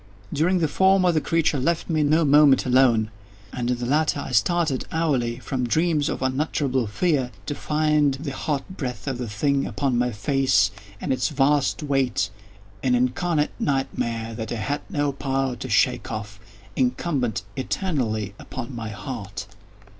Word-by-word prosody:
During 165 +5 +2
the 165 -3 +2
former 190 +2 +4
the 155 -2 +1
creature 165 -3 +1
left 165 +5 0
me 155 -3 +1
no 155 +2 +3
moment 145 -1 +6
alone, 125 -4 +3 0.4
and 120 -1 -2
in 125 - +1
the 120 - -4
latter 150 +3 +1
I 135 - -5
started 160 -1 +1
hourly 135 -8 0
from 125 -1 -3
dreams 155 +2 +1
of - - -3
unutterable 130 -2 0
fear 135 - +1 0.2
to 145 - -2
find 150 -2 +1
the 140 +1 -5
hot 140 +1 -2
breath 125 -4 -4
of 130 -3 -2
the 120 -3 -4
thing 140 +7 0
upon 130 -4 0
my 125 0 +1
face, 110 -2 +2 0.3
and 135 - -1
its 130 - 0
vast 145 +1 +2
weight—an 105 -4 -2
incarnate 150 +6 +1
nightmare 115 -4 -1
that 110 -1 -5
I - - -1
had 130 +7 -2
no 145 -6 0
power 135 -2 -1
to 130 +2 -6
shake 120 +1 +2
off—incumbent 110 - -3
eternally 125 - -2
upon 130 0 -7
my 115 -2 -5
_heart! 100 -3 -6
135 Hz, 155 wpm, -24 LUFS, 120-150 Hz, 0.4 s, moment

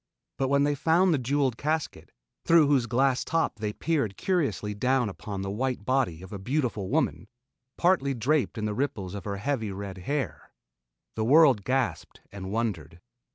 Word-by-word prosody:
But 135 - +1
when 140 +1 +3
they 145 0 +2
found 165 +5 +3
the 145 - +1
jeweled 130 -1 0
casket, 155 +3 -3 0.3
through 165 -2 +5
whose 140 -4 +2
glass 130 +2 +2
top 165 -8 -1
they 105 -1 -2
peered 140 -6 -1
curiously 135 - -1
down 125 +2 +1
upon 100 0 -6
the 95 - -3
white 125 0 -2
body 125 -10 0
of 95 - -10
a 100 - -5
beautiful 115 -4 -2
woman, 80 +7 0 0.5
partly 170 -7 +2
draped 130 +2 0
in 110 - -2
the 105 - -1
ripples 105 -7 -3
of 100 - -7
her 100 -1 -3
heavy, 110 -2 -2
red 95 -1 -6
hair, 140 +8 -4 0.6
the 110 - -1
world 135 -3 +5
gasped 130 +3 -2
and 95 -1 -7
wondered. 100 -8 -3
125 Hz, 170 wpm, -27 LUFS, 100-140 Hz, 0.6 s, through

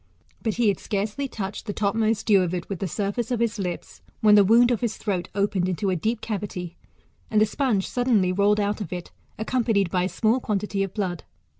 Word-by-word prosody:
But 220 -3 -1
he 235 -2 +3
had 200 - 0
scarcely 210 +7 -2
touched 205 -2 -6
the 205 - -2
topmost 215 +1 0
dew 200 -3 +5
of 180 0 -1
it 175 - -5
with 195 -4 -4
the 195 - -2
surface 205 +5 -2
of 245 -2 -1
his 230 -2 0
lips, 180 -3 -5 0.2
when 210 -1 +5
the 205 -1 +8
wound 235 +5 +5
of 235 - 0
his 235 -3 -1
throat 190 -5 -2
opened 200 -2 +1
into 185 +2 -1
a - - +1
deep 220 +7 -1
cavity, 190 -5 -4 0.5
and 215 - +3
the 215 - +5
sponge 215 -3 0
suddenly 235 -7 +2
rolled 205 +3 +3
out 205 +1 -1
of 190 - -5
it, 180 -1 -6 0.3
accompanied 220 -5 +1
by 180 -1 +1
a - - -1
small 225 +5 +1
quantity 205 -3 -2
of 195 -2 -1
blood. 185 -6 -2
205 Hz, 215 wpm, -25 LUFS, 190-225 Hz, 0.5 s, the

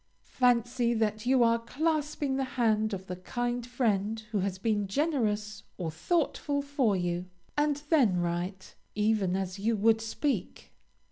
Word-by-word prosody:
Fancy 240 -1 +2
that 215 +1 -1
you 260 -1 +5
are 230 0 +3
clasping 295 +2 -1
the 270 - 0
hand 220 -2 +2
of 190 -2 -5
the 180 - -5
kind 240 +6 -2
friend 220 -4 0
who 210 - 0
has 190 0 -1
been 205 0 0
generous 215 - 0 0.2
or 170 -4 -3
thoughtful 285 - 0
for 275 -7 +1
you, 175 -1 -1 0.3
and 295 0 +1
then 245 - +4
write, 175 +2 -3 0.2
even 210 -3 +1
as 190 0 -3
you 225 +3 +1
would 220 +2 +3
speak. 270 +6 -3
225 Hz, 145 wpm, -29 LUFS, 195-260 Hz, 0.3 s, you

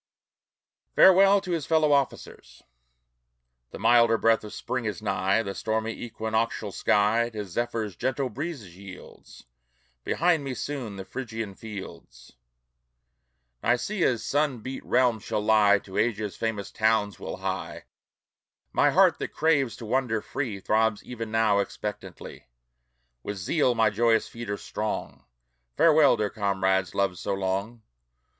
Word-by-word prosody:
FAREWELL 195 +1 +7
TO 185 - -6
HIS 165 -4 -2
FELLOW 155 -2 +3
OFFICERS 65 - -3 1.1
The - - -9
milder 115 -1 +4
breath 115 0 +2
of 105 - -8
Spring 125 -2 -4
is 105 -5 -3
nigh; 100 +4 0
The 100 - -5
stormy 110 +2 -2
equinoctial 110 -1 -3
sky 105 +5 +2
To 105 -3 -6
Zephyr's 110 0 -3
gentle 130 +4 -1
breezes 135 - -6
yields. 95 -8 -13 0.6
Behind 170 -3 +1
me 135 -2 -4
soon 130 -9 -5
the 95 -1 -7
Phrygian 115 -5 -6
fields, 85 - -10 1.3
Nicæa's 125 - +1
sun 145 -4 0
beat 130 +4 -6
realm, 125 -3 +2
shall 105 - -3
lie. 105 -1 +4
To 95 -1 -6
Asia's 110 -3 -1
famous 110 -3 -3
towns 110 -2 +1
we'll - - -6
hie. - - -4 0.9
My - - +4
heart, - - +4
that - - -5
craves 140 -8 +2
to 115 - -9
wander 120 -1 0
free, 110 -2 -4
Throbs 110 +1 +1
even 115 -2 -6
now 110 -2 +2
expectantly. 100 -8 -6 0.7
With 100 +9 -5
zeal 125 - +1
my 110 -2 +3
joyous 115 +1 +2
feet 115 -2 -8
are 100 - -2
strong; 100 -13 -5 0.5
Farewell, 155 -3 +5
dear 105 -1 -1
comrades, 95 -3 0
loved 100 -3 0
so - - -2
long! 100 +4 -3
110 Hz, 135 wpm, -26 LUFS, 100-125 Hz, 1.3 s, FAREWELL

